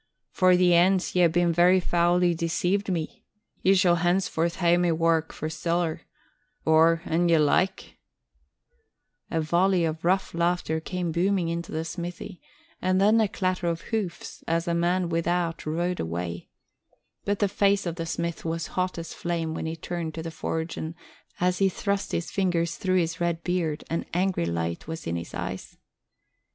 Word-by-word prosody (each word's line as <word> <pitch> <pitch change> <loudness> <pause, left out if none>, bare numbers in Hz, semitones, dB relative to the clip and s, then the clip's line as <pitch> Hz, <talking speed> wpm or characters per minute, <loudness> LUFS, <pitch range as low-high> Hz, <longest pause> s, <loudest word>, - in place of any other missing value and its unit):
For 185 -1 +4
the 180 -1 +4
ance 180 +2 +3
ye 180 - +4
hae 175 - +7 0.2
very 175 +2 +4
foully 175 0 +2
deceived 175 +4 0
me. 165 -3 -4 0.4
Ye 195 +1 +4
shall 180 -2 +4
hence 175 +3 +2
forth 170 +1 -1
hae 175 -2 +3
my 175 -1 +2
wark 165 0 +1
for 155 - -5
siller; 165 +1 -1 0.6
or, 160 +1 +4
an 170 +2 +1
ye 165 - +5
like 185 +5 +1 0.7
" 475 -2 -48
A 165 - -1
volley 175 +3 +2
of 160 0 -3
rough 190 +3 +1
laughter 170 -1 0
came 175 +1 -3
booming 180 +1 +1
into 170 0 -4
the 160 +1 -3
smithy, 175 +2 -6 0.4
and 185 0 +2
then 215 +3 +5
a 215 - +3
clatter 185 -3 -1
of 170 0 -1
hoofs 205 -6 -4
as 165 0 0
the 170 - 0
man 175 +1 +1
without 170 0 -1
rode 175 +3 -1
away; 85 +1 -4 0.7
but 205 0 0
the 205 - +2
face 200 0 +2
of 170 -1 -3
the 165 -1 -4
smith 170 0 -3
was 165 0 -2
hot 185 -1 -1
as 165 0 -6
flame 165 -2 -2
when 160 - -4
he 160 - -3
turned 165 0 -5
to 160 - -5
the 165 - -5
forge, 160 +1 -4
and, 160 +1 -5 0.4
as 180 0 +1
he 195 -1 +4
thrust 200 +2 -2
his 165 - -2
fingers 170 -4 0
through 185 -1 0
his 165 0 -1
red 170 -1 -1
beard, 170 -4 -1
an 165 - -2
angry 180 - +1
light 85 - -3
was 160 0 -6
in 85 - -2
his 85 0 -6
eyes. - - -6
170 Hz, 175 wpm, -26 LUFS, 165-185 Hz, 0.7 s, hae